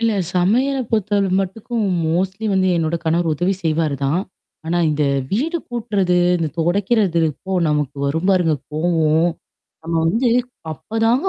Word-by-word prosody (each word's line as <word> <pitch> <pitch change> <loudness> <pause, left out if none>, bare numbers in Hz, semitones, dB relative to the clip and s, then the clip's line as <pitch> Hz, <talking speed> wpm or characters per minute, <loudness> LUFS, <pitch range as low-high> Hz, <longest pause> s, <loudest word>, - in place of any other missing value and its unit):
இல்ல 230 -1 +2 0.2
சமையல 240 +10 +2
பொறுத்தவல 205 -3 +1
மட்டுக்கும் 225 +5 -3 0.2
மோஸ்ட்லி 190 +6 -1
வந்து 190 -1 +2
என்னோட 165 0 0
கணவர் 165 0 +1
உதவி 180 +5 0
செய்வாரு 155 -2 0
தான். 150 +6 +1 0.5
ஆனா, 175 +2 0
இந்த 150 0 0 0.3
வீடு 300 - 0
கூட்டுறது, 205 -7 0 0.2
இந்த 165 -2 -1
தொடைக்கிறது 190 +1 +1
அப்போ 190 +6 -8 0.2
நமக்கு 150 -2 -1
வரும் 160 +6 -1
பாருங்க 175 -5 +3 0.2
கோவோம். 160 +1 +2 0.5
நம்ம 165 +1 -4
வந்து 230 +9 +2 0.4
அப்பதாங்க 225 - 0
180 Hz, 135 wpm, -20 LUFS, 160-215 Hz, 0.5 s, பாருங்க